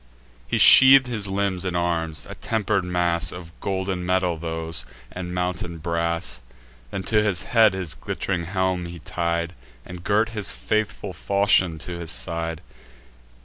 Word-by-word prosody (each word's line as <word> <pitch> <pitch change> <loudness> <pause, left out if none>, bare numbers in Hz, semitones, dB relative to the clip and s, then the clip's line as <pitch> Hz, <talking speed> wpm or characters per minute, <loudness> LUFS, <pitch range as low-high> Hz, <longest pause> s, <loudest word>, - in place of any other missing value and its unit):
He - - 0
sheath'd 135 0 +8
his 110 -5 -3
limbs 95 -2 -1
in 90 -2 -2
arms; 80 -3 -1
a - - -7
temper'd 105 -3 -1
mass 85 -2 0
Of 85 -2 -9
golden 95 -2 -2
metal 90 -1 +1
those, 80 0 -4 0.3
and 90 -1 -6
mountain 90 -1 -3
brass. 85 -5 -2 0.5
Then 95 - -4
to 105 +3 +2
his 105 -5 +1
head 110 -5 +4
his 90 -5 -3
glitt'ring 90 -3 -3
helm 95 -1 -1
he 85 0 -8
tied, 85 +1 -2 0.3
And 90 -1 -9
girt 105 +4 +2
his 105 -3 -2
faithful 105 -2 -2
falchion 95 -4 +2
to 85 +2 -7
his 85 -2 -5
side. 80 +6 -2
90 Hz, 145 wpm, -23 LUFS, 85-100 Hz, 0.5 s, sheath'd